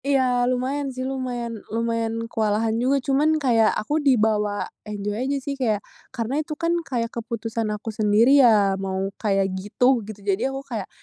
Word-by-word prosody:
Iya, 255 -3 +2
lumayan 265 +3 -1
sih, 255 0 -5
lumayan 245 -4 -4
lumayan 230 0 -1
kewalahan 220 -1 0
juga. 265 +3 +3
Cuman 295 +3 +3
kayak 235 -7 +3
aku 295 +8 -1
dibawa 215 -6 +2 0.2
enjoy 205 -1 -4 0.2
aja, 280 - +1
sih. 280 - -2
Kayak 225 -7 -1 0.2
karena 250 +6 -2
itu 305 0 -6
kan 335 0 0
kayak 240 -7 -3
keputusan 230 -1 -3
aku 210 +1 -4
sendiri 220 +7 +5
ya 210 -5 +5
mau 195 0 -2
kayak 195 -3 +1
gitu 230 +6 +1
gitu. 205 -1 -10
Jadi, 200 +1 +1
aku 270 +1 -6
kayak, 220 -7 -5
230 Hz, 165 wpm, -23 LUFS, 210-265 Hz, 0.2 s, sendiri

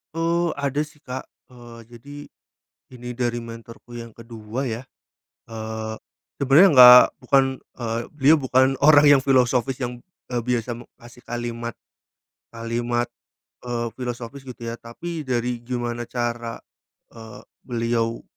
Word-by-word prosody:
Eee, 170 +1 +1
ada 140 0 -1
sih 150 -1 -22
Kak. 130 +1 -6 0.2
Eee, 120 -1 -13 0.2
jadi, 145 +5 -12 0.8
ini 125 -1 -9
dari 120 -1 -1
mentorku 115 +1 -11
yang 115 -1 -8
ke-2 115 +2 -6
ya. 115 +1 -4 0.7
Eee, 110 0 -5 0.4
sebenarnya 140 +8 +6
enggak, 125 -1 +11 0.2
bukan, 135 +2 +4 0.3
eee, 115 -1 -2
beliau 150 +2 +5
bukan 130 0 +2
orang 145 0 +7
yang - - -1
filosofis 130 -1 +2
yang, 125 -1 -3 0.3
eee, 120 -1 -1
biasa, 120 -1 -1
mmm, 120 - -11
kasih 120 +1 -16
kalimat, 120 0 -5 0.8
kalimat, 120 +1 -2 0.6
eee, 120 -1 -2
filosofis 125 +2 -6
gitu 125 -2 -10
ya. 115 0 -5
Tapi 155 +7 -7
dari 120 -1 -1
gimana 120 -1 -4
cara, 120 -1 -3 0.5
eee, 110 -2 -12 0.3
beliau, 115 -1 -1
120 Hz, 125 wpm, -23 LUFS, 115-130 Hz, 0.8 s, enggak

